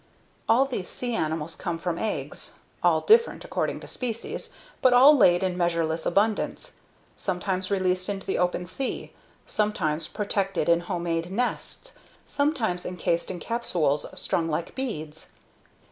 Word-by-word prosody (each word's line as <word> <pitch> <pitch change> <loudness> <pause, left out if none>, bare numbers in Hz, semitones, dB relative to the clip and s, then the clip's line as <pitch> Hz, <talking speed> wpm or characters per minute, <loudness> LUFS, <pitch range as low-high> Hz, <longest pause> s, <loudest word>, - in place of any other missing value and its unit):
All 250 +4 +5
these 240 -9 -4
sea 245 -1 -3
animals 160 -4 -2
come 170 - -3
from 170 0 -3
eggs, 220 - -3 0.3
all - - +4
different 465 +2 +4
according - - -2
to - - -10
species, 230 -3 -4 0.3
but 255 -1 +5
all 270 +5 +8
laid 180 -8 +5
in 185 -1 0
measureless 170 -2 0
abundance 210 +4 0 0.4
sometimes 185 0 -1
released 185 -1 +1
into 195 -1 -4
the - - -1
open 180 0 0
sea, 255 +9 -4 0.3
sometimes 165 -8 0
protected 195 -4 -1
in 170 0 +5
homemade 170 -1 -2
nests, 250 - -3 0.3
sometimes 245 - 0
encased 170 -1 -1
in 180 - -4
capsules 170 -12 +1
strung 165 -1 0
like 160 +2 -2
beads. 160 - -5
185 Hz, 135 wpm, -26 LUFS, 170-225 Hz, 0.4 s, all